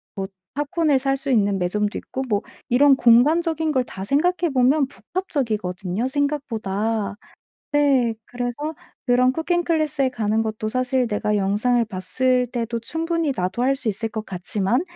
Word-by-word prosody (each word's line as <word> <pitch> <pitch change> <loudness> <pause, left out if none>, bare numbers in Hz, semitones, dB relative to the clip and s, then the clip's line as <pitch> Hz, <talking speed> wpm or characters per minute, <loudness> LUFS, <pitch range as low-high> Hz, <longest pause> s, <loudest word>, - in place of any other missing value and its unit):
뭐 195 -2 -3 0.3
팝콘을 295 -1 +1
살 270 +1 +1
수 275 +1 -6
있는 205 -4 +3
매점도 205 +4 -1
있고 265 - -5
뭐 205 -3 +1 0.3
이런 275 +3 +6
공간적인 310 +7 +4
걸 260 -3 +2
다 190 -4 -7
생각해 345 - +1
보면 265 +3 +3
복합적이거든요, 220 - -3
생각보다. 225 -8 -1 0.6
네 275 -5 +3
그래서 245 +6 -4 0.3
그런 250 0 +4
쿠킹 345 +4 0
클래스에 305 -5 +1
가는 220 -2 0
것도 215 -1 -3
사실 255 +2 +1
내가 210 0 0
영상을 210 +5 +2
봤을 250 +6 0
때도 235 -1 -3
충분히 325 +4 -1
나도 185 +6 -1
할 270 +2 +3
수 265 -4 -3
있을 220 +2 -1
것 220 -1 -5
같지만 195 - -1
250 Hz, 315 characters per minute, -22 LUFS, 215-285 Hz, 0.6 s, 이런